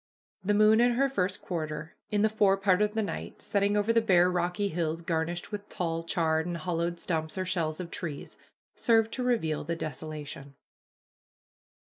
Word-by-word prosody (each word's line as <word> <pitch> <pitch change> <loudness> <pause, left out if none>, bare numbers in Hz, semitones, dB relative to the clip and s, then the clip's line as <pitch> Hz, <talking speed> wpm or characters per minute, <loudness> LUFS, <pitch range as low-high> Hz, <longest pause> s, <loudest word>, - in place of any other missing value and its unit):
The 205 +2 +2
moon 215 +2 +6
in 245 0 +4
her 275 +3 +3
first 195 -8 -2
quarter, 155 -2 -4 0.2
in 205 0 +1
the - - +6
fore 205 -3 +3
part 195 -1 +3
of 210 +1 +1
the 220 - +1
night, 205 - -5
setting 200 0 +1
over 210 +2 +2
the 230 - +4
bare 180 -4 +4
rocky 180 +3 0
hills 165 -1 -2
garnished 165 +1 -2
with 205 -1 -6
tall, 165 -2 -2
charred, 160 -1 +1
and 175 -1 -3
hollow 170 +1 -1
stumps 160 -1 -3
or 185 - -1
shells 165 -3 -1
of 175 -2 -6
trees, 155 -7 -5 0.4
served 225 -1 +3
to 255 - -2
reveal 220 -12 0
the 170 +3 -2
desolation. 150 -2 -6
180 Hz, 175 wpm, -29 LUFS, 160-210 Hz, 0.4 s, moon